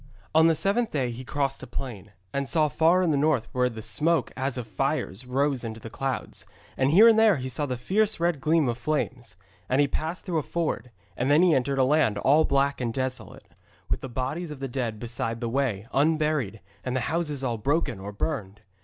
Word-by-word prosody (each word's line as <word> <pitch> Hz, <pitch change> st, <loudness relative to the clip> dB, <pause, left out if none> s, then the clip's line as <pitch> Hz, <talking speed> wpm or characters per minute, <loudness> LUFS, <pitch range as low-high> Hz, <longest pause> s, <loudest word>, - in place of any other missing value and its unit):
On 160 Hz, +1 st, +6 dB
the 165 Hz, -, +4 dB
seventh 215 Hz, +7 st, +1 dB
day 130 Hz, -5 st, -1 dB
he 120 Hz, +2 st, -7 dB
crossed 135 Hz, +1 st, -2 dB
a 130 Hz, -, -8 dB
plain, 110 Hz, -5 st, -7 dB, 0.2 s
and 140 Hz, -2 st, -2 dB
saw 155 Hz, +4 st, +3 dB
far 165 Hz, +6 st, +3 dB
in 170 Hz, -, +2 dB
the 145 Hz, -, +2 dB
north 140 Hz, -5 st, +2 dB
where 125 Hz, 0 st, +1 dB
the 110 Hz, -2 st, -8 dB
smoke 150 Hz, +11 st, +1 dB
as 135 Hz, 0 st, -2 dB
of 125 Hz, -, -4 dB
fires 130 Hz, -2 st, -2 dB
rose 135 Hz, 0 st, 0 dB
into 110 Hz, -1 st, -5 dB
the 115 Hz, 0 st, -9 dB
clouds, 135 Hz, 0 st, -4 dB, 0.3 s
and 130 Hz, 0 st, +2 dB
here 200 Hz, +10 st, +8 dB
and 225 Hz, -1 st, +6 dB
there 220 Hz, -6 st, +5 dB
he 130 Hz, 0 st, -4 dB
saw 145 Hz, +3 st, -2 dB
the 125 Hz, -2 st, -3 dB
fierce 210 Hz, -, +1 dB
red 170 Hz, -4 st, 0 dB
gleam 155 Hz, -1 st, +3 dB
of 120 Hz, 0 st, -2 dB
flames. 125 Hz, -6 st, -2 dB, 0.3 s
And 130 Hz, -, +2 dB
he 145 Hz, -, +4 dB
passed 160 Hz, +5 st, -4 dB
through 170 Hz, -4 st, 0 dB
a -, -, -1 dB
ford, 150 Hz, -6 st, -2 dB, 0.3 s
and 125 Hz, +6 st, -1 dB
then 150 Hz, +4 st, +5 dB
he 180 Hz, -3 st, +5 dB
entered 135 Hz, 0 st, +1 dB
a 135 Hz, -, +4 dB
land 130 Hz, -6 st, +3 dB
all 145 Hz, +9 st, +4 dB
black 140 Hz, 0 st, +1 dB
and 120 Hz, -2 st, -1 dB
desolate, 130 Hz, -1 st, -5 dB, 0.4 s
with -, -, 0 dB
the 135 Hz, -, -6 dB
bodies 135 Hz, +8 st, -3 dB
of 150 Hz, -3 st, -8 dB
the 135 Hz, -, -3 dB
dead 120 Hz, -4 st, -3 dB
beside 115 Hz, -1 st, -3 dB
the 120 Hz, -, -2 dB
way, 115 Hz, -5 st, -1 dB
unburied, 150 Hz, -7 st, +1 dB, 0.2 s
and 125 Hz, 0 st, -2 dB
the 130 Hz, -, +1 dB
houses 150 Hz, 0 st, -2 dB
all 120 Hz, -3 st, -1 dB
broken 140 Hz, -3 st, 0 dB
or 100 Hz, +2 st, -6 dB
burned. 105 Hz, -4 st, -4 dB
135 Hz, 220 wpm, -26 LUFS, 120-155 Hz, 0.4 s, here